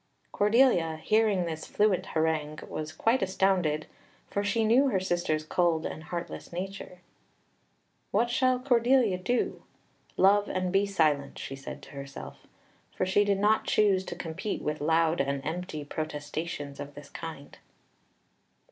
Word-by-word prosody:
Cordelia, 205 Hz, -7 st, +3 dB
hearing 210 Hz, +1 st, +2 dB
this 160 Hz, -1 st, -5 dB
fluent 205 Hz, -3 st, +1 dB
harangue, 155 Hz, -1 st, 0 dB
was 155 Hz, 0 st, -5 dB
quite 230 Hz, +9 st, +1 dB
astounded, 185 Hz, -5 st, +1 dB, 0.5 s
for 200 Hz, -, 0 dB
she 220 Hz, +2 st, +1 dB
knew 250 Hz, +6 st, +5 dB
her 200 Hz, -8 st, +1 dB
sister's 175 Hz, -4 st, -1 dB
cold 165 Hz, 0 st, +1 dB
and 155 Hz, -, -6 dB
heartless 170 Hz, +2 st, -6 dB
nature. 180 Hz, 0 st, -6 dB, 1.1 s
"What 235 Hz, +4 st, +1 dB
shall 255 Hz, +1 st, +3 dB
Cordelia 245 Hz, -5 st, +3 dB
do? 240 Hz, +7 st, -1 dB, 0.6 s
Love 205 Hz, +2 st, +4 dB
and 185 Hz, -1 st, -1 dB
be 195 Hz, +1 st, +3 dB
silent," 155 Hz, -7 st, +1 dB
she 135 Hz, -, -6 dB
said 135 Hz, -, -9 dB
to -, -, -12 dB
herself, 140 Hz, -1 st, -9 dB, 0.5 s
for -, -, 0 dB
she 190 Hz, +2 st, +3 dB
did 200 Hz, -1 st, +1 dB
not 210 Hz, +2 st, +3 dB
choose 200 Hz, -3 st, +3 dB
to -, -, -6 dB
compete 180 Hz, +6 st, -4 dB
with 150 Hz, 0 st, -2 dB
loud 160 Hz, +2 st, +2 dB
and 140 Hz, 0 st, -1 dB
empty 160 Hz, -2 st, -4 dB
protestations 145 Hz, -1 st, -5 dB
of 145 Hz, 0 st, -7 dB
this 145 Hz, 0 st, -11 dB
kind. 160 Hz, -4 st, -8 dB
180 Hz, 140 wpm, -28 LUFS, 155-205 Hz, 1.1 s, knew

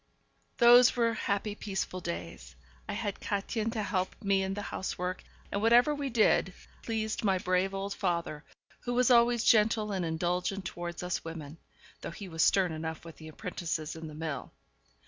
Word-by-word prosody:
Those 240 Hz, 0 st, +7 dB
were 230 Hz, -1 st, +2 dB
happy, 205 Hz, -1 st, -1 dB
peaceful 190 Hz, -3 st, -4 dB
days. 170 Hz, 0 st, -6 dB, 0.3 s
I -, -, -1 dB
had 205 Hz, -3 st, -3 dB
Kätchen 215 Hz, +2 st, -2 dB
to 220 Hz, -3 st, -2 dB
help 185 Hz, -2 st, -1 dB
me 195 Hz, -2 st, +2 dB
in 190 Hz, 0 st, -2 dB
the 205 Hz, -, -4 dB
housework, 185 Hz, -1 st, -4 dB, 0.3 s
and 200 Hz, -, -1 dB
whatever 240 Hz, +6 st, +5 dB
we 285 Hz, -2 st, -3 dB
did 215 Hz, -5 st, +3 dB, 0.3 s
pleased 220 Hz, -1 st, -2 dB
my 195 Hz, -3 st, +3 dB
brave 185 Hz, +1 st, +1 dB
old 195 Hz, +1 st, -3 dB
father, 170 Hz, -4 st, -2 dB, 0.4 s
who 245 Hz, 0 st, -3 dB
was 250 Hz, +1 st, +4 dB
always 235 Hz, -1 st, +5 dB
gentle 215 Hz, -1 st, +3 dB
and 190 Hz, -2 st, -1 dB
indulgent 180 Hz, +4 st, -1 dB
towards 175 Hz, 0 st, -5 dB
us 180 Hz, 0 st, -2 dB
women, 165 Hz, -1 st, -8 dB, 0.4 s
though -, -, -5 dB
he 195 Hz, +3 st, -8 dB
was 160 Hz, -3 st, 0 dB
stern 185 Hz, -3 st, +3 dB
enough 160 Hz, +1 st, -5 dB
with 165 Hz, -, -11 dB
the 155 Hz, -, -11 dB
apprentices 160 Hz, -1 st, -4 dB
in 160 Hz, 0 st, -7 dB
the 155 Hz, -, -9 dB
mill. 155 Hz, -4 st, -5 dB
195 Hz, 170 wpm, -30 LUFS, 170-220 Hz, 0.4 s, Those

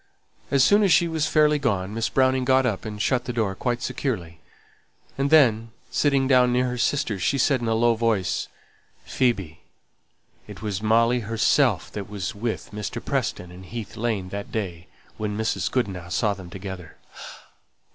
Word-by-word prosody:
As 140 Hz, -1 st, +4 dB
soon 205 Hz, +7 st, +5 dB
as 200 Hz, -3 st, +3 dB
she 170 Hz, -, +5 dB
was 160 Hz, -2 st, -1 dB
fairly 150 Hz, -1 st, +3 dB
gone, 100 Hz, -7 st, -1 dB
Miss 115 Hz, +1 st, -1 dB
Browning 130 Hz, -1 st, +2 dB
got 130 Hz, 0 st, +3 dB
up 110 Hz, -4 st, -2 dB
and 105 Hz, -1 st, -6 dB
shut 125 Hz, +3 st, 0 dB
the -, -, -3 dB
door 110 Hz, -5 st, -1 dB
quite 120 Hz, +4 st, -2 dB
securely, 85 Hz, -, -3 dB, 0.8 s
and 135 Hz, +1 st, 0 dB
then 115 Hz, -8 st, +4 dB, 0.2 s
sitting 140 Hz, -2 st, +2 dB
down 125 Hz, -2 st, +4 dB
near 125 Hz, +1 st, +1 dB
her 125 Hz, -, -4 dB
sister, 120 Hz, -6 st, 0 dB
she 90 Hz, +11 st, +1 dB
said, 135 Hz, -1 st, +2 dB
in 120 Hz, -, -2 dB
a 115 Hz, -, +1 dB
low 120 Hz, +1 st, +3 dB
voice, 110 Hz, -5 st, 0 dB, 0.6 s
"Phoebe, 100 Hz, -11 st, -1 dB, 0.9 s
it -, -, -10 dB
was 105 Hz, -2 st, -3 dB
Molly 115 Hz, +3 st, +3 dB
herself 110 Hz, 0 st, +1 dB
that 100 Hz, -2 st, -6 dB
was 100 Hz, -4 st, -4 dB
with 110 Hz, +2 st, -4 dB
Mr. 105 Hz, -1 st, -4 dB
Preston 90 Hz, -1 st, -2 dB
in 90 Hz, +1 st, -11 dB
Heath 110 Hz, +3 st, -7 dB
Lane 110 Hz, -5 st, -2 dB
that 100 Hz, +1 st, -6 dB
day 90 Hz, -6 st, -4 dB, 0.3 s
when 105 Hz, -1 st, -3 dB
Mrs. 110 Hz, 0 st, -1 dB
Goodenough 95 Hz, -8 st, -2 dB
saw 100 Hz, +3 st, +1 dB
them 95 Hz, -3 st, -10 dB
together!" 95 Hz, -2 st, -8 dB
115 Hz, 170 wpm, -24 LUFS, 100-130 Hz, 0.9 s, soon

